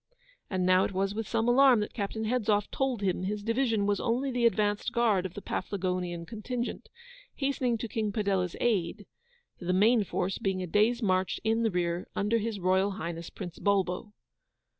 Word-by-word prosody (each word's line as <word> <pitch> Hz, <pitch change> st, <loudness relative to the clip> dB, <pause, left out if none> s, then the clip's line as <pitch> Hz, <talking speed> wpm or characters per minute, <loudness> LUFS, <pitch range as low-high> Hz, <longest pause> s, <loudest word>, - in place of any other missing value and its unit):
And 185 Hz, -2 st, 0 dB
now 185 Hz, +1 st, +5 dB
it -, -, -2 dB
was 195 Hz, +1 st, 0 dB
with 220 Hz, 0 st, -4 dB
some 230 Hz, 0 st, 0 dB
alarm 255 Hz, -1 st, +6 dB
that 210 Hz, -, -4 dB
Captain 220 Hz, +1 st, -3 dB
Hedzoff 215 Hz, -3 st, +1 dB
told 260 Hz, -6 st, -1 dB
him 185 Hz, -2 st, 0 dB
his 205 Hz, +2 st, -3 dB
division 230 Hz, -2 st, +1 dB
was 205 Hz, 0 st, +1 dB
only 255 Hz, +3 st, 0 dB
the 245 Hz, -1 st, +3 dB
advanced 210 Hz, 0 st, 0 dB
guard 220 Hz, -6 st, +2 dB
of 180 Hz, -, -18 dB
the 205 Hz, -, -7 dB
Paflagonian 180 Hz, -3 st, -3 dB
contingent, 235 Hz, +4 st, -5 dB, 0.5 s
hastening 265 Hz, -4 st, 0 dB
to 235 Hz, -, -4 dB
King 215 Hz, -1 st, -2 dB
Padella's 195 Hz, -4 st, 0 dB
aid; 205 Hz, -3 st, 0 dB, 0.5 s
the 180 Hz, 0 st, -1 dB
main 215 Hz, +4 st, +4 dB
force 190 Hz, 0 st, -2 dB
being 190 Hz, -1 st, -1 dB
a -, -, -2 dB
day's 220 Hz, +7 st, +2 dB
march 185 Hz, -2 st, +1 dB
in 225 Hz, +1 st, +1 dB
the 225 Hz, -, +2 dB
rear 175 Hz, -2 st, -1 dB
under 210 Hz, +3 st, +1 dB
His 220 Hz, -1 st, -3 dB
Royal 190 Hz, +2 st, +2 dB
Highness 170 Hz, -1 st, -5 dB
Prince 175 Hz, -4 st, -8 dB
Bulbo. 200 Hz, 0 st, 0 dB
205 Hz, 180 wpm, -29 LUFS, 185-230 Hz, 0.5 s, alarm